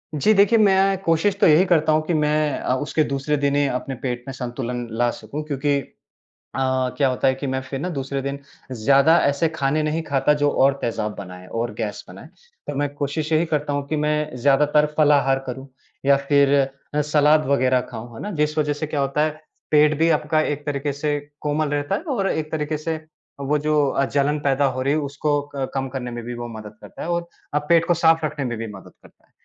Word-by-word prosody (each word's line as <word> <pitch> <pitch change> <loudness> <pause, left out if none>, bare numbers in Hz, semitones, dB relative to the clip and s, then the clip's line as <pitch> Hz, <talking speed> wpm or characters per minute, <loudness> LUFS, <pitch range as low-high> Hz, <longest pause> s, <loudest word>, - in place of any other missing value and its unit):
जी। 180 +9 +3
देखिए, 205 +3 +5
मैं 195 -1 +4
कोशिश 165 +3 +2
तो - - +7
यही 160 +4 +6
करता 160 -4 +3
हूँ 155 0 +3
कि 175 - 0
मैं 150 -1 +1 0.2
उसके 155 +1 +1
दूसरे 140 +1 -1
दिन 140 0 +1
ही 145 - +3
अपने 130 +1 -3
पेट 125 -2 -3
में 135 - -4
संतुलन 125 -1 -4
ला 120 0 +2
सकूँ, 150 +2 -7
क्योंकि 145 -1 0 0.8
अ, 130 -1 0
क्या 140 -2 +3
होता 130 +1 +1
है 130 - +2
कि 135 +2 -5
मैं 130 0 -1
फिर 135 +1 -6
ना 180 - -2
दूसरे 135 -3 -3
दिन, 140 +1 -3 0.3
ज़्यादा 140 +7 +4
ऐसे 140 +3 +1
खाने 155 -1 0
नहीं 155 +2 -1
खाता 140 +1 +2
जो 145 - +4
और 135 0 +3
तेज़ाब 110 -2 -2
बनाएँ 90 -2 -9
और 120 -1 -2
गैस 105 -2 -4
बनाएँ। - - -12 0.4
तो 145 - -3
मैं 145 +1 0
कोशिश 145 +2 -3
यही 160 +1 +3
करता 150 -1 0
हूँ 145 0 -2
कि 155 - -1
मैं 150 -2 -1
ज़्यादातर 145 +3 +3
फलाहार 140 -3 +4
करूँ 130 +1 -6 0.4
या 140 - +6
फिर 140 -1 +4 0.4
सलाद 150 0 +4
वग़ैरह 130 -2 +2
खाऊँ, 115 0 -8
है - - -8
ना? 210 - -4
जिस 150 -3 -1
वज़ह 150 -1 +1
से 145 +1 -4
क्या 150 -1 -2
होता 140 +2 +1
है 155 - 0 0.4
पेट 150 0 +4
भी 165 - +3
आपका 155 +1 0
एक 145 -1 -2
तरीके 145 0 -2
से 145 +1 -1 0.2
कोमल 150 0 0
रहता 145 +6 -1
है 200 - -2
और 195 -2 0
एक 155 -1 -2
तरीके 155 0 -1
से 160 +1 -3 0.4
वो 145 +2 0
जो 150 -1 +2
अ, 140 - +1
जलन 145 +2 0
पैदा 140 -1 +1
हो 130 -1 0
रही 140 +2 +1
है 155 - +1
उसको 145 +1 -1
क 135 -1 -2
कम 135 0 -2
करने 130 -2 -5
में 120 0 -6
भी 120 - -5
वो 120 0 -6
मदद 105 -1 -10
करता - - -10
है - - -5
और 170 0 -1 0.3
अब 150 - +1
पेट 170 -1 +5
को 175 - +4
साफ़ 165 -1 +3
रखने 150 -2 -4
में 120 -2 -3
भी 115 - -4
मदद 95 -1 -12
करता - - -21
है। - - -38
145 Hz, 220 wpm, -22 LUFS, 135-155 Hz, 0.8 s, तो